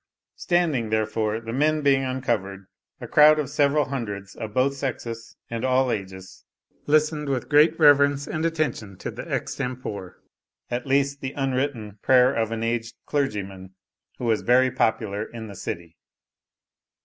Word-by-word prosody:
Standing, 160 -10 0
therefore, 110 0 0
the 115 0 -7
men 155 +3 +2
being 135 -1 +3
uncovered, 115 -7 -2 0.3
a - - -7
crowd 155 +1 +6
of 145 -3 -2
several 145 0 +2
hundreds 100 -7 -5
of 110 -1 -6
both 130 +4 +2
sexes, 115 -4 -5
and 115 -1 -5
all 130 0 +2
ages, 95 -2 -6 0.4
listened 150 0 +2
with 130 -3 -2
great 155 +2 +5
reverence 145 -2 +5
and 155 - -3
attention 155 - -2
to - - -5
the - - -8
extempore, 110 -7 -4 0.6
at 120 +2 -3
least 140 +1 +1
the 130 0 -4
unwritten, 130 -6 -2
prayer 130 0 +5
of 115 -1 -1
an 115 0 -3
aged 115 0 -2
clergyman,* 100 -9 -3 0.4
who 125 - -5
was 110 -2 +1
very 130 +1 +4
popular 110 -4 0
in 115 0 -8
the 100 -2 -9
city. 85 -2 -6
125 Hz, 150 wpm, -24 LUFS, 110-140 Hz, 0.6 s, crowd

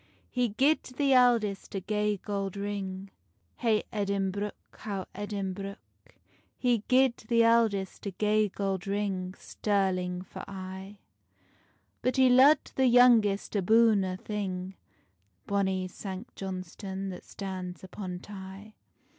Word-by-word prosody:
He 250 -2 +1
gied 275 +9 +3
the 270 +2 0
eldest 235 -7 +3
a - - 0
gay 210 +1 0
gold 200 -1 -4
ring, 195 -1 -4 0.5
Hey 220 -3 +2
Edinbruch, 200 0 -1 0.2
how 195 -4 -4
Edinbruch. 200 -1 -4 0.8
He 245 -2 +2
gied 255 -1 +4
the 230 0 +4
eldest 220 -4 +2
a - - 0
gay 210 +2 +1
gold 195 -1 -3
ring, 195 -2 -2
Stirling 185 -3 -1
for 190 - -9
aye: 190 +1 -8 1.0
But 255 - 0
he 260 -1 +6
lo'ed 265 +4 +6
the 265 -1 +4
youngest 235 -5 +5
aboon 215 +1 +4
a' 185 -1 -3
thing, 190 -2 -4 0.7
Bonny 190 -2 0
Sanct 190 +4 -8
Johnstonne 190 +1 -5
that 180 - -9
stands 185 -2 -6
upon 185 -1 -6
Tay. 195 +1 -10
200 Hz, 120 wpm, -29 LUFS, 190-220 Hz, 1.0 s, he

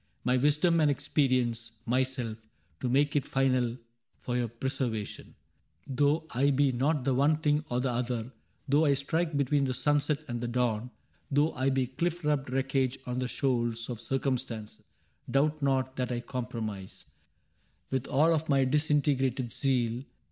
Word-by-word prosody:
My 125 0 +2
wisdom 150 +6 +3
and 150 -2 +4
experience 125 -5 0
— - - -37
myself. 130 -4 -1 0.4
To 125 - -1
make 145 +3 +2
it 145 - +1
final 130 -3 +1 0.2
— 115 0 -45
for 120 - -2
your 120 -1 +1
preservation; 115 -2 -4 0.5
Though 145 +4 +1
I 135 +4 +2
be 140 0 +3
not 135 +2 0
the 135 - +2
one 140 +4 +4
thing 150 -1 +1
or 125 +1 0
the 130 -1 0
other. 120 0 -2 0.3
Though 145 +3 +4
I 140 -2 +4
strike 160 +3 -1
between 140 0 +2
the 130 -1 -1
sunset 145 +1 +1
and 120 -1 -4
the 120 - -2
dawn. 120 -1 0 0.4
Though 145 +3 +2
I 130 +1 +1
be 135 -1 +1
cliiF 170 +7 -2
rubbed 145 -3 0
wreckage 135 0 0
on 125 0 -2
the 130 - -1
shoals 120 -3 -1
Of 120 -2 -6
Circumstance, 125 -3 -2 0.2
— - - -23
doubt 150 +2 +1
not 130 -1 0
that 125 -1 -1
I 120 -1 -2
comprise, 115 -6 -5 0.9
With 130 -1 -1
all 155 +5 +4
of 160 0 -1
my 135 -2 +4
disintegrated 135 -3 +1
zeal. 125 -3 0
130 Hz, 165 wpm, -29 LUFS, 125-145 Hz, 0.9 s, and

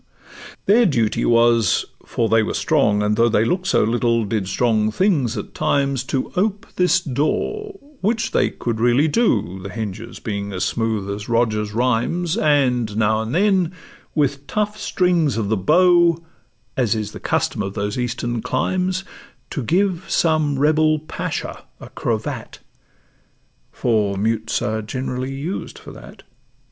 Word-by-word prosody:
Their 225 +3 +5
duty 115 -9 +1
was—for 115 0 +2
they 115 0 +4
were 110 - -2
strong, 105 -10 +2
and 105 0 +1
though 115 +1 +3
They 110 0 +2
look'd 180 +9 -1
so - - +3
little, 115 0 +1
did 100 -2 -2
strong 110 +1 +1
things 135 - +1
at 105 - -6
times— 140 -2 0
To 130 0 -2
ope 205 +3 0
this 180 +1 +3
door, 390 - -2 0.2
which 225 +2 0
they - - +2
could 115 -2 -4
really 120 +6 +3
do, 115 - +1
The 100 - -7
hinges 110 +2 -6
being 100 -2 -4
as 90 - -1
smooth 110 -3 -1
as 105 +2 -6
Rogers' 110 -3 0
rhymes; 130 - 0
And 125 - +1
now 110 0 +2
and 110 +6 -3
then, 190 -2 +2 0.4
with 140 -2 0
tough 210 0 -1
strings 175 - +1
of 105 -3 -1
the 110 - +2
bow, 170 - +4 0.6
As 120 -3 +1
is 105 -1 -3
the - - -9
custom - - -1
of 95 0 -4
those 105 +3 -2
Eastern 120 -1 -2
climes, 185 - -1 0.5
To 140 - -3
give 185 - 0
some 155 -4 +2
rebel 155 +2 +3
Pacha 155 +1 -5
a - - -11
cravat; - - -4 1.1
For 105 -4 0
mutes 110 +2 -1
are 110 +1 -1
generally 130 +3 -4
used 160 +8 -5
for - - -11
that. - - -13
125 Hz, 150 wpm, -21 LUFS, 110-165 Hz, 1.1 s, Their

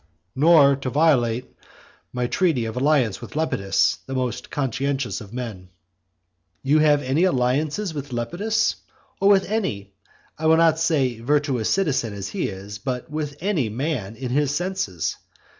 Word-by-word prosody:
"Nor 145 -1 +6
to 135 -1 -4
violate 125 -5 +1 0.6
my 125 0 -2
treaty 130 -1 +1
of 110 0 -5
alliance 130 -6 +1
with - - -10
Lepidus, 125 -12 +1
the 135 - -4
most 125 -1 -3
conscientious 135 -5 -2
of 105 -2 -11
men." 115 -7 -6 0.9
You 145 +3 +3
have 150 -1 +4
any 135 +6 +1
alliance 145 -1 +1 0.2
with 145 -2 -6
Lepidus 175 - 0 0.4
or 195 - +4
with 195 -1 +5
any 105 - -3 0.5
(I 160 - 0
will 160 0 +6
not 165 -1 +4
say 140 -8 +1
virtuous 135 -2 0
citizen, 140 - 0
as 100 -1 -5
he - - -2
is, 100 +1 -8
but 130 +1 -4
with 150 -2 -4
any) 175 - 0
man 115 -3 -3
in 125 0 -5
his 145 +1 +1
senses! 175 - -2
135 Hz, 150 wpm, -23 LUFS, 120-155 Hz, 0.9 s, Nor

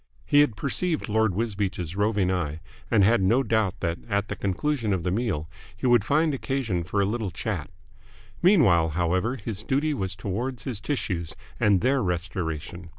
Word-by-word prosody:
He 145 - +4
had 145 -7 +4
perceived 155 - -1
Lord 110 -3 +2
Wisbeach's 100 -6 -2
roving 105 -2 +1
eye, 80 -4 -2 0.3
and 105 -3 +4
had 110 +2 +4
no 115 +8 +3
doubt 110 -6 0
that 85 -1 -1
at 100 0 0
the - - -3
conclusion 110 +3 -1
of 90 -3 -1
the 90 - 0
meal 95 -8 -1 0.3
he - - -5
would 120 -4 +5
find 155 +5 +2
occasion 130 -10 -1
for 100 +5 0
a - - +2
little 110 0 -2
chat. 85 - -4 0.7
Meanwhile, 115 - +5
however, 90 +8 +1
his 105 -4 -5
duty 140 +6 0
was 95 -8 -3
towards 105 +5 -4
his 115 -6 -3
tissues 100 - -3 0.2
and 100 -3 +4
their 130 +2 +2
restoration. 85 -2 -3
105 Hz, 170 wpm, -26 LUFS, 90-125 Hz, 0.7 s, would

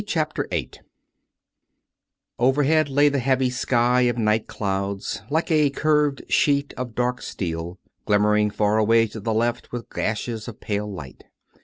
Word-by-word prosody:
CHAPTER - - -1
VIII - - -3 1.7
Overhead 145 +4 +3
lay 145 +2 +4
the 140 -1 +1
heavy 130 0 +1
sky 125 0 +2
of 120 - -2
night 110 -1 +1
clouds 100 -1 -3
like 160 +3 0
a 150 -2 +4
curved 150 0 +1
sheet 140 -1 +2
of 125 -3 -6
dark 125 0 -1
steel, 85 0 -5 0.3
glimmering 105 0 +3
far 105 +1 +1
away 115 +1 +4
to 110 0 -8
the 110 +2 -2
left 120 +2 -1
with 120 -1 -6
gashes 110 +1 -3
of 115 - -8
pale 105 0 -3
light. 75 -9 -10
120 Hz, 145 wpm, -23 LUFS, 105-135 Hz, 1.7 s, lay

